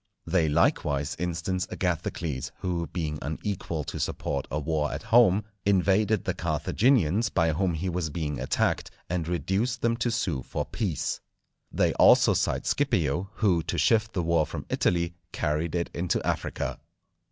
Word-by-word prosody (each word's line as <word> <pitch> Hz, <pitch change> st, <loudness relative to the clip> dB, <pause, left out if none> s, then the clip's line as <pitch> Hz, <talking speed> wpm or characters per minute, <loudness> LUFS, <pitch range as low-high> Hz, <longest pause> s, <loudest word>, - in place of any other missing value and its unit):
They 85 Hz, -4 st, +2 dB
likewise 75 Hz, -2 st, +1 dB
instance 90 Hz, +2 st, -2 dB
Agathocles, 85 Hz, -5 st, -2 dB
who, 85 Hz, -2 st, -1 dB
being 75 Hz, -4 st, -3 dB
unequal 80 Hz, 0 st, -3 dB
to -, -, -6 dB
support 70 Hz, -2 st, -2 dB
a 70 Hz, -, -2 dB
war 75 Hz, 0 st, -1 dB
at -, -, -5 dB
home, 110 Hz, -3 st, +5 dB, 0.2 s
invaded 100 Hz, +1 st, +3 dB
the -, -, -1 dB
Carthaginians, 115 Hz, -, +2 dB
by 80 Hz, -2 st, +2 dB
whom 85 Hz, +2 st, 0 dB
he 85 Hz, +4 st, -3 dB
was 90 Hz, -2 st, -1 dB
being 75 Hz, -3 st, -3 dB
attacked, 65 Hz, -, 0 dB, 0.2 s
and 85 Hz, -3 st, -1 dB
reduced 100 Hz, +8 st, -1 dB
them 115 Hz, 0 st, +3 dB
to 120 Hz, +1 st, 0 dB
sue 95 Hz, -, -1 dB
for -, -, -4 dB
peace. 95 Hz, -9 st, -2 dB, 0.5 s
They -, -, +2 dB
also -, -, +6 dB
cite -, -, 0 dB
Scipio, 85 Hz, +5 st, +1 dB
who 95 Hz, -6 st, +2 dB
to 80 Hz, +2 st, -3 dB
shift 110 Hz, +8 st, +2 dB
the 90 Hz, -, -1 dB
war 80 Hz, -2 st, +2 dB
from -, -, -6 dB
Italy, 85 Hz, 0 st, +1 dB, 0.2 s
carried 75 Hz, +3 st, -1 dB
it 85 Hz, -1 st, -1 dB
into 85 Hz, 0 st, 0 dB
Africa. -, -, -2 dB
85 Hz, 150 wpm, -27 LUFS, 80-95 Hz, 0.5 s, also